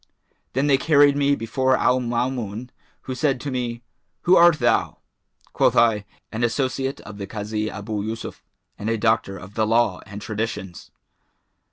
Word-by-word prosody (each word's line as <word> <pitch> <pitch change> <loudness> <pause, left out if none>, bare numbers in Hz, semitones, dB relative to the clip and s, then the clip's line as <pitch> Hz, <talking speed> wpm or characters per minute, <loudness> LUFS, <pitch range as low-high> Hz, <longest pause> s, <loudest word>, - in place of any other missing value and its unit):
Then 135 +3 +1
they 140 -2 +3
carried 145 -1 +5
me 140 0 +2
before 130 +2 +1
Al 125 0 +3
Maamun, 120 -1 -3 0.3
who 130 - -5
said 130 +1 0
to 145 - -4
me, 120 -2 -3 0.4
'Who 180 +2 +5
art 170 -2 +6
thou?' - - +1 0.6
Quoth - - +3
I, 110 -3 +3 0.3
'An 115 +2 -3
associate 130 +3 -1
of 105 0 -11
the 100 - -5
Kazi 105 +1 -3
Abu 105 +1 -4
Yъsuf 110 +2 -6 0.4
and 105 - -3
a 115 - +1
doctor 110 -3 +1
of 95 +2 -11
the 110 0 0
law 115 -4 +2
and 100 +1 -8
traditions.' 105 -4 -5
115 Hz, 160 wpm, -23 LUFS, 105-130 Hz, 0.6 s, art